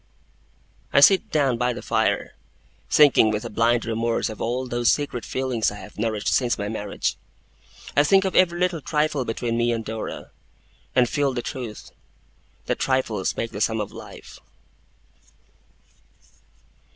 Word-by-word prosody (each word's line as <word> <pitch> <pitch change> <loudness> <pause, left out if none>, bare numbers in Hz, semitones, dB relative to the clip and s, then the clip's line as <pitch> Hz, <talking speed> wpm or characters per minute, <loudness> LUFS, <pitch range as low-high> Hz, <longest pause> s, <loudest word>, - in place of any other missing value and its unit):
I - - +5
sit 190 +7 +5
down 135 -6 +1
by 125 0 +1
the - - -8
fire, - - 0 0.6
thinking 145 -7 +6
with 105 0 -2
a - - -6
blind 115 +2 +2
remorse 115 0 -1
of 110 - -9
all 125 +3 -1
those 120 -1 +2
secret 140 -5 -2
feelings 130 -4 -1
I 105 - -8
have 105 - -12
nourished 110 -2 -1
since 125 -2 +1
my 100 - -3
marriage. 105 -2 -3 0.8
I 145 - +5
think 195 +5 +4
of 190 - -2
every 175 -2 +3
little 180 -3 0
trifle 150 -3 0
between 115 +1 -2
me 120 0 +2
and 115 -1 -3
Dora, 110 0 -6 0.6
and 125 -1 +4
feel 140 +1 0
the 120 -1 -3
truth, 120 -6 -7 0.7
that - - -2
trifles 130 -7 0
make 115 - -3
the 105 - -6
sum 110 0 +1
of 105 - -4
life. - - -12
120 Hz, 150 wpm, -23 LUFS, 110-140 Hz, 0.8 s, thinking